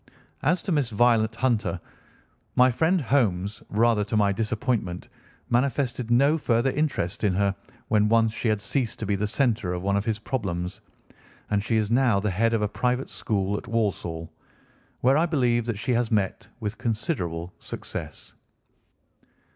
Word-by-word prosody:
As 165 +5 +1
to 195 - -3
Miss 145 -7 +1
Violet 115 0 +3
Hunter, 110 -8 0 0.8
my 125 +1 +6
friend 165 +9 +2
Holmes, 110 - 0
rather 110 0 +3
to 110 - -1
my 100 -1 +3
disappointment, 105 -3 -2 0.4
manifested 125 -1 0
no 140 +7 +4
further 120 -1 +2
interest 135 - -1
in 100 -3 +2
her 100 0 +2 0.3
when 105 -1 +3
once 115 -1 +3
she 115 - -2
had 105 -1 0
ceased 120 0 -1
to 110 - -4
be 100 0 +1
the 105 +2 -1
centre 110 -6 0
of 90 0 -4
one 100 0 +1
of 100 - +1
his 110 -2 0
problems, 95 -8 -3 0.7
and 100 -1 +1
she 115 0 +1
is 110 0 0
now 120 -4 +3
the 105 0 -1
head 115 +5 +2
of 110 - 0
a - - +2
private 125 +5 -1
school 100 -2 -1
at - - -8
Walsall, 85 -8 -2 0.7
where 130 +3 +4
I 170 - +2
believe 120 -7 +1
that 115 -4 -2
she 120 +5 -2
has 120 -1 +1
met 100 -4 -1
with 110 -1 -4
considerable 90 - -2
success. - - -7
115 Hz, 165 wpm, -25 LUFS, 100-125 Hz, 0.8 s, my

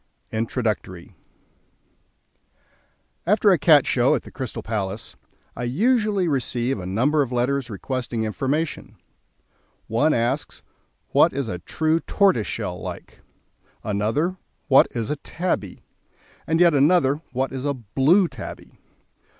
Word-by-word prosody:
After 115 +3 -2 2.9
a 185 - +5
Cat 150 -4 +6
Show 125 +1 +3
at - - -3
the - - -12
Crystal 130 -5 -6
Palace, 105 -2 -4 0.4
I - - -6
usually 210 - +1
receive 130 -4 -1
a 90 - -6
number 130 +11 +2
of 130 -3 -2
letters 125 +1 0
requesting 120 +1 -3
information. 140 +8 -2 0.9
One 140 +8 +2
asks: 120 +5 -2 0.5
"What - - +4
is 135 -2 -2
a 90 -4 -4
true 160 - 0
tortoiseshell 165 - 0
like?" - - -8 0.6
Another: 110 - -1 0.3
"What 135 -1 +6
is 115 0 -3
a 150 - -2
tabby?" 160 - -3 0.6
and 160 0 +1
yet 175 -2 +6
another: 145 0 +3
"What 130 +1 -1
is 130 -1 -5
a 140 -1 -1
blue 135 - +3
tabby?" 120 -10 -10
135 Hz, 120 wpm, -23 LUFS, 115-155 Hz, 2.9 s, Cat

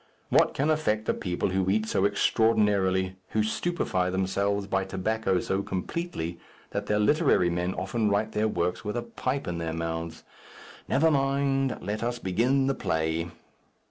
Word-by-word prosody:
What - - +3
can 150 +3 +2
affect 110 -9 0
a - - +4
people 90 0 -2
who 95 0 +1
eat 110 +2 +2
so 100 -3 +1
extraordinarily, 100 -3 +2 0.2
who 110 - +4
stupefy 110 - -1
themselves 100 +2 0
by 95 -1 0
tobacco 95 +1 0
so 95 +1 -1
completely 95 - -4 0.3
that 100 0 -3
their 105 - +2
literary 105 - +3
men 90 +2 -1
often 105 +3 0
write 105 +2 +1
their 110 0 +1
works 90 -2 -1
with 105 +1 -3
a 120 - -2
pipe 130 +3 -3
in 85 -1 -3
their 80 -1 -3
mouths? 80 0 -4 0.6
Never 160 +4 +3
mind. 135 -1 +1
Let 105 +1 -3
us 120 +1 -1
begin 120 +7 +1
the 135 - +2
play." 80 -7 -1
100 Hz, 160 wpm, -27 LUFS, 95-120 Hz, 0.6 s, a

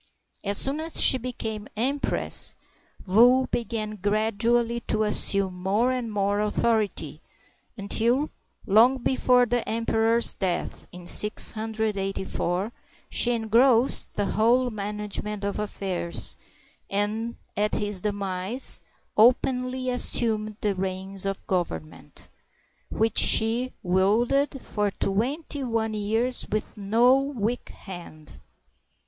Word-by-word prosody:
As 200 0 +2
soon 275 +3 +1
as 320 +1 0
she 260 - +7
became 220 -3 -6
empress, 270 +5 0 0.5
Wu 245 +7 +5
began 220 -3 -4
gradually 225 +4 0
to 215 0 +1
assume 200 -2 +1
more 195 +7 0
and 250 -3 -3
more 205 0 0
authority, 210 0 -1 0.6
until, 235 +8 0 0.3
long 235 +6 +4
before 250 -1 +2
the 245 0 0
emperor's 230 +1 +2
death 185 -3 -4
in 180 0 -11
684, 210 -2 +1 0.4
she 245 - +2
engrossed 235 +2 +3
the 205 - -1
whole 240 +5 +2
manage 210 0 -4
ment 210 -1 -6
of 200 +1 -3
affairs, 190 -4 -2 0.5
and 215 +4 -2 0.2
at 210 +1 0
his 205 -3 -2
demise 200 +3 -1 0.3
openly 255 +2 +2
assumed 215 -4 -1
the 205 -1 0
reins 190 +1 -3
of 195 0 -5
government, 160 - -5 0.6
which 220 0 +2
she 235 +3 +4
wielded 230 +10 +1
for 210 -4 -2
twenty 265 - -3
one 225 -3 -2
years 225 +4 +1
with 215 +1 -3
no 225 +5 +3
weak 245 -4 -3
hand. 170 - -12
215 Hz, 105 wpm, -25 LUFS, 200-240 Hz, 0.6 s, she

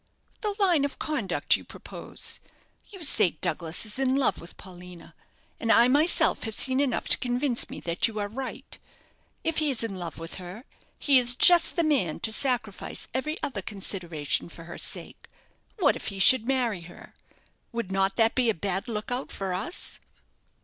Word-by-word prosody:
"The 420 -2 -1
line 360 -8 +3
of 280 -1 -3
conduct 230 - +1
you - - -6
propose. - - -3 0.5
You 385 -5 -10
say 210 - +2
Douglas 165 +4 -2
is 215 +4 -6
in 265 -1 +2
love 275 -1 +1
with 170 - -12
Paulina, 180 -1 -12 0.5
and 230 - +1
I 235 - +6
myself 300 +6 +4
have 220 -1 -5
seen 260 0 +1
enough 275 -3 0
to - - +5
convince 245 0 -1
me - - -7
that 170 +1 0
you 220 -1 -8
are 205 -1 -1
right. 255 +5 -7 0.6
If 325 -1 0
he 305 -1 +1
is 250 -4 -1
in 225 -3 -3
love 175 -1 -6
with 165 +1 -6
her, 180 +6 -9 0.3
he 275 -3 +5
is 245 0 +2
just 350 +5 +6
the 340 - +2
man 270 - +1
to 220 - -1
sacrifice 245 -6 -1
every 305 +6 -2
other 220 -8 -2
consideration 175 -7 -2
for 165 - -11
her 170 +1 -6
sake. - - -3 0.5
What 380 - +3
if - - -7
he 200 - -4
should 230 +4 +6
marry 245 -8 0
her? 170 +1 -14 0.6
Would 230 -5 -4
not 195 0 +1
that 225 0 +3
be 250 -2 +2
a 225 - +1
bad 195 +5 -3
look 215 0 -4
out 250 +2 -3
for 190 -2 -4
us?" 205 - -1
230 Hz, 185 wpm, -27 LUFS, 190-270 Hz, 0.6 s, I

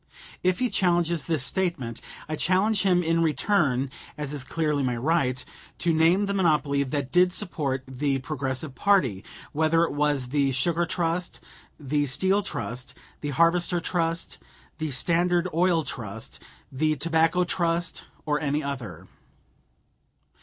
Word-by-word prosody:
If 180 0 +2
he 250 +1 0
challenges 175 -4 +1
this 160 -6 0
statement, 160 -9 -2 0.3
I 155 - -2
challenge 190 +6 +2
him 180 -2 +3
in 165 0 +1
return 150 -5 +1 0.3
(as 150 -1 -3
is 145 -3 -2
clearly 150 +1 -1
my 125 -3 0
right) 130 -2 0 0.3
to 170 -1 +1
name 165 +5 +4
the 200 - -2
monopoly 150 -7 +2
that 140 -1 -2
did 180 +1 +4
support 145 -9 -2
the 135 +1 -1
Progressive 135 0 -3
party, 130 - +2 0.3
whether 160 +2 +2
it 170 - -1
was 145 -3 0
the 140 -1 +1
Sugar 170 +6 0
Trust, 175 0 -2 0.4
the 145 0 0
Steel 190 +9 +2
Trust, 125 - -5 0.2
the 145 - -4
Harvester 170 +4 +3
Trust, 165 -1 -2 0.4
the 155 -1 -2
Standard 175 +6 +1
Oil 170 -1 +3
Trust, 110 -5 -6 0.3
the 155 +3 +1
Tobacco 165 +4 +2
Trust, 170 -1 -1 0.2
or 150 0 0
any 150 0 0
other. 115 - -6
155 Hz, 140 wpm, -26 LUFS, 135-175 Hz, 0.4 s, name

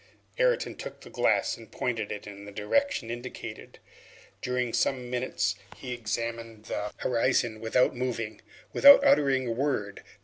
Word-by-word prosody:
Ayrton - - +2
took - - -8
the - - -13
glass - - +1
and - - -14
pointed 115 -4 -2
it 105 - -6
in 100 -1 -10
the 100 - -9
direction 115 - 0
indicated. 120 -2 -8 0.6
During 125 -2 -1
some 125 -2 0
minutes 125 -4 0 0.2
he 125 -2 -5
examined 115 -1 -4
the 105 -1 -3
horizon 120 -2 +1
without 125 +3 +2
moving, 120 -3 -3 0.3
without 280 0 +9
uttering 140 - +4
a - - -1
word. 115 -5 -2
120 Hz, 140 wpm, -28 LUFS, 110-130 Hz, 0.6 s, without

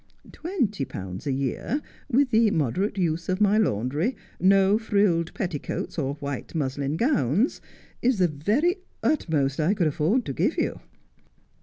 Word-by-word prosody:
Twenty 255 - -2
pounds 95 -3 -6
a - - +1
year, 135 - -1 0.3
with 265 0 +3
the 225 -1 +5
moderate 185 - 0
use 170 -2 -1
of 185 +1 0
my 210 +1 +4
laundry, 150 - 0 0.2
no 195 +2 +4
frilled 200 -7 +1
petticoats 175 -3 -3
or 140 -1 -1
white 140 +1 -6
muslin 140 0 -1
gowns, 230 - +1 0.4
is 250 -1 +2
the 180 -2 +4
very 215 - +1 0.3
utmost 150 - +1
I 165 +7 +2
could 185 -5 +1
afford 160 - +1
to - - -3
give - - 0
you.' - - -1
180 Hz, 145 wpm, -25 LUFS, 145-220 Hz, 0.4 s, the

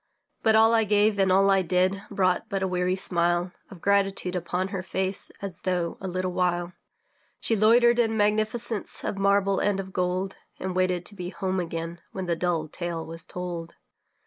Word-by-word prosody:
But 220 -1 +4
all 225 +1 +6
I 225 -1 +4
gave 210 0 +2
and 190 -1 +3
all 195 +1 +5
I 195 -1 +4
did 185 +2 +1
Brought 185 -3 +1
but 195 -1 -1
a - - +1
weary 180 0 0
smile 175 -1 +1 0.2
Of 185 -4 -12
gratitude 195 -2 +1
upon 180 +2 -2
her 195 -2 -3
face 190 +1 -3
As 190 -4 -6
though, 180 -2 -1
a 190 - -4
little 185 0 -2
while, 175 -1 0 0.7
She 225 - +2
loitered 235 +3 +5
in 225 -2 +2
magnificence 215 +1 0
Of 195 - -3
marble 200 0 +3
and 205 -1 +1
of 190 -1 -6
gold, 185 +1 -1 0.2
And 185 -1 -4
waited 185 -1 +1
to 205 - -3
be 180 -2 -5
home 190 0 -2
again, 165 0 -4
When 190 -1 -4
the 170 -1 0
dull 165 -2 -1
tale 170 0 -5
was 165 0 -9
told. 175 -2 -6
185 Hz, 185 wpm, -26 LUFS, 180-200 Hz, 0.7 s, all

